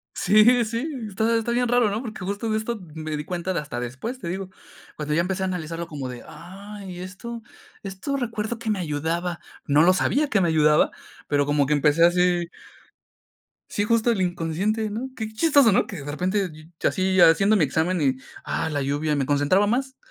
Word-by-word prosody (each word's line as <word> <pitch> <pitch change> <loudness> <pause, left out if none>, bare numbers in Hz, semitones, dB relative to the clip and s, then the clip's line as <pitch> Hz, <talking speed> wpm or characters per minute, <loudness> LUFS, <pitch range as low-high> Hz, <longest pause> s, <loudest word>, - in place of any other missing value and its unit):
Sí, 220 +5 +5
sí, 230 +7 -3 0.2
está 220 +4 +1
está 230 +1 -1
bien 245 0 +1
raro, 245 -3 +3
¿no? 210 +2 -2
Porque 215 -6 -7
justo 205 +3 -3
de 215 - +1
esto 220 0 -4
me 155 -1 -4
di 150 - -5
cuenta 180 +2 -3
de - - 0
hasta 140 -5 -6
después, 130 - -5
te 175 - -6
digo. 185 +2 -4 0.5
Cuando 150 0 -2
ya 165 - +3
empecé 190 +2 -2
a - - 0
analizarlo 170 -2 -4
como 145 -5 -6
de: 125 -1 -8
"Ay, 195 +1 -10
¿y - - -7
esto?" 225 +6 -7 0.4
Esto 195 +8 -4
recuerdo 230 -2 -3
que 225 -2 -3
me 210 - 0
ayudaba. 165 +2 -2 0.3
No 145 +1 +4
lo 180 - +6
sabía 285 +10 +1
que 215 - +2
me 175 - +2
ayudaba, 150 -1 +4 0.4
pero 145 -1 +2
como 145 -1 +2
que 150 - -1
empecé 150 +3 +4
así 175 0 +3 1.2
sí 205 - -1
justo 230 +2 +2
el 195 -4 0
inconsciente, 185 +6 -1
¿no? 240 +5 -4
Qué 220 -1 -4
chistoso, 265 0 +4
¿no? - - +3
Que 195 - -7
de 145 - -8
repente, 185 +4 -1 0.3
llo - - +3
así 185 0 +1
haciendo 195 +6 +6
mi 165 - +4
examen 160 +6 0
y, 135 -3 +2 0.3
ah, 160 - -2
la 145 - -1
lluvia 145 +2 0
me 135 -2 0
concentraba 145 +8 +3
más. 260 +4 -1
185 Hz, 205 wpm, -24 LUFS, 160-220 Hz, 1.2 s, lo